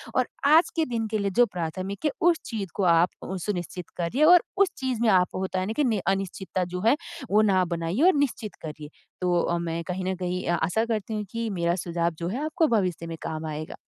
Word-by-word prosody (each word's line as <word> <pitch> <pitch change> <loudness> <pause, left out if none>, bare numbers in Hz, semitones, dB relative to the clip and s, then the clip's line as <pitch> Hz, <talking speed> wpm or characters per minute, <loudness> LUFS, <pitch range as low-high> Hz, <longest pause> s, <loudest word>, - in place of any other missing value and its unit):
और 255 -1 +2 0.2
आज 315 +4 +6
के 325 - +3
दिन 230 -4 -2
के 215 0 -1
लिए 200 -1 -1
जो 245 - +8
प्राथमिक 185 - -5
है, 300 - +3
उस 340 -1 +4
चीज़ 210 -6 -4
को 200 - 0
आप 165 +2 +4 0.4
सुनिश्चित 180 -3 -4
करिए 230 - +1
और 355 +1 +7
उस 390 -2 +4
चीज़ 260 -4 -2
में 235 - +4
आपको 185 -2 +3
होता 190 0 -2
है 185 - -1
ना 215 - -2
कि, 295 - +1
नहीं 225 -7 +1
अनिश्चितता 195 -1 -1
जो 180 - -2
है, 275 - +5 0.3
वो 210 +2 +5
ना 195 -3 +3
बनाइए 170 - -2
और 375 - +6
निश्चित 255 -7 -1
करिए। 150 -1 -7 0.3
तो 175 -1 +2
अ, 170 - 0
मैं 170 0 -3
कहीं 185 0 -3
न - - -2
कहीं 180 0 -2
अ, 175 - +2
आशा 200 +8 +1
करती 220 -1 -2
हूँ, 210 - -2
की 230 -1 -2
मेरा 170 -3 0
सुझाव 170 -1 0
जो 170 - -2
है, 250 +9 -3
आपको 315 +1 +2
भविष्य 180 -4 -2
में 165 0 -6
काम 160 0 -4
आएगा। 155 0 -5
190 Hz, 235 wpm, -26 LUFS, 175-230 Hz, 0.4 s, जो